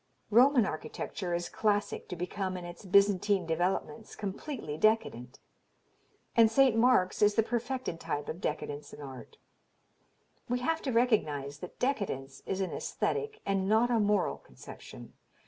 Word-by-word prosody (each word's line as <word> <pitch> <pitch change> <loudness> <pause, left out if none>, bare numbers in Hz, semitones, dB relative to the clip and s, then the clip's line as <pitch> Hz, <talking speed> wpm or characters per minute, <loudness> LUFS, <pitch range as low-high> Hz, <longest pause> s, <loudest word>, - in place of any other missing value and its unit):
Roman 245 +1 +6
architecture 175 +2 -4
is 175 0 -2
classic 205 -1 -1
to 180 - -4
become 185 +2 -3
in 175 - -7
its 175 +3 -10
Byzantine 200 0 +3
developments 180 +7 -2
completely 205 - -5
decadent, 150 - +1 1.0
and 230 -1 +6
St. 260 0 +4
Mark's 225 -5 +3
is 210 0 +5
the 225 - +4
perfected 240 -5 -3
type 150 -3 -3
of 170 - -5
decadence 145 -1 -4
in 150 - -10
art.... 130 -4 -10 1.1
We 245 - +1
have 325 +5 0
to 265 - -2
recognize 150 - +1
that 180 - -9
decadence 190 - -2
is 190 0 -1
an 190 - -2
aesthetic 440 -1 -2
and 195 -1 0
not 225 +3 +3
a 235 - +3
moral 205 -2 +1
conception. 65 -1 -12
200 Hz, 145 wpm, -30 LUFS, 165-230 Hz, 1.1 s, Roman